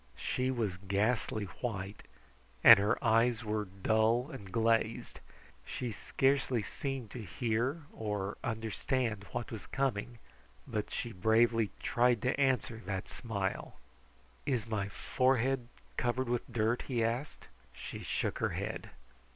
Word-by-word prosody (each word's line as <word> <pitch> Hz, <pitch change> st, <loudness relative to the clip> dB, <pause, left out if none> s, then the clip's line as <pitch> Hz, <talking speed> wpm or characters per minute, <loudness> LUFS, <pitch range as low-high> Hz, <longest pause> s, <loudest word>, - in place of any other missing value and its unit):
She 130 Hz, 0 st, -1 dB
was 110 Hz, -8 st, -1 dB
ghastly 105 Hz, +3 st, 0 dB, 0.2 s
white, 100 Hz, -4 st, -3 dB, 0.6 s
and -, -, +11 dB
her 100 Hz, +1 st, +2 dB
eyes 115 Hz, +1 st, +4 dB
were 105 Hz, 0 st, -1 dB
dull 110 Hz, -, +1 dB
and 100 Hz, -9 st, -9 dB
glazed. 115 Hz, 0 st, +1 dB, 0.4 s
She 125 Hz, -, -4 dB
scarcely 135 Hz, +2 st, +1 dB
seemed 135 Hz, -5 st, -4 dB
to 125 Hz, -, -6 dB
hear 120 Hz, -, -1 dB
or 105 Hz, -2 st, -3 dB
understand 115 Hz, -1 st, -1 dB
what 120 Hz, -, -4 dB
was 110 Hz, -3 st, -7 dB
coming, 125 Hz, -3 st, -1 dB, 0.5 s
but 110 Hz, -4 st, -3 dB
she 120 Hz, -, -3 dB
bravely 110 Hz, +2 st, +3 dB
tried 120 Hz, -2 st, +3 dB
to 130 Hz, +2 st, +1 dB
answer 125 Hz, -4 st, +1 dB
that 95 Hz, -2 st, -2 dB
smile. 100 Hz, -6 st, -3 dB, 0.7 s
"Is 125 Hz, -6 st, +1 dB
my 105 Hz, -3 st, -2 dB
forehead 130 Hz, +1 st, +1 dB, 0.3 s
covered 125 Hz, 0 st, 0 dB
with 120 Hz, 0 st, -1 dB
dirt?" 115 Hz, +1 st, +1 dB
he 120 Hz, -4 st, +1 dB
asked. 120 Hz, +6 st, -2 dB, 0.3 s
She -, -, -7 dB
shook -, -, -2 dB
her -, -, +1 dB
head. -, -, -4 dB
115 Hz, 125 wpm, -33 LUFS, 105-125 Hz, 0.7 s, and